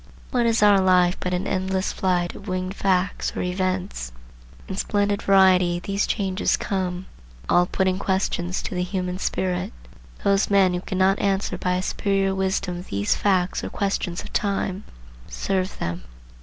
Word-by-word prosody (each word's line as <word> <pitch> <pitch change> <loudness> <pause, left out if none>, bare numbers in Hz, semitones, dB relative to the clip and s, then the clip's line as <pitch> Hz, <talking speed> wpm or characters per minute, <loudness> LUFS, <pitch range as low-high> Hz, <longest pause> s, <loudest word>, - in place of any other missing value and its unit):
What 240 -3 +2
is 225 -2 +2
our 200 -2 +6
life 180 -1 +4
but 180 - -2
an 180 +2 -1
endless 190 0 -1
flight 175 -2 0
of 200 - -11
winged 185 0 -2
facts 190 0 0
or - - -1
events? 185 - -2 0.6
In 190 - -4
splendid 205 0 0
variety 185 -3 +4
these 195 +3 -1
changes 195 -1 0
come, 185 -2 -2 0.4
all 175 0 +4
putting 190 0 0
questions 190 -2 -1
to - - -5
the 180 - -1
human 180 0 -3
spirit. 185 -2 -1 0.5
Those 200 0 +2
men 195 -2 +4
who 180 - -2
cannot 190 +1 +1
answer 195 -1 0
by 180 0 -1
a 185 - -1
superior 195 -1 0
wisdom 190 -2 -1
these 100 +1 +1
facts 185 -3 +1
or - - -3
questions 195 -3 -2
of - - -11
time, 200 -1 -1 0.4
serve 190 -1 -2
them. 85 +1 -3
190 Hz, 155 wpm, -23 LUFS, 180-195 Hz, 0.6 s, our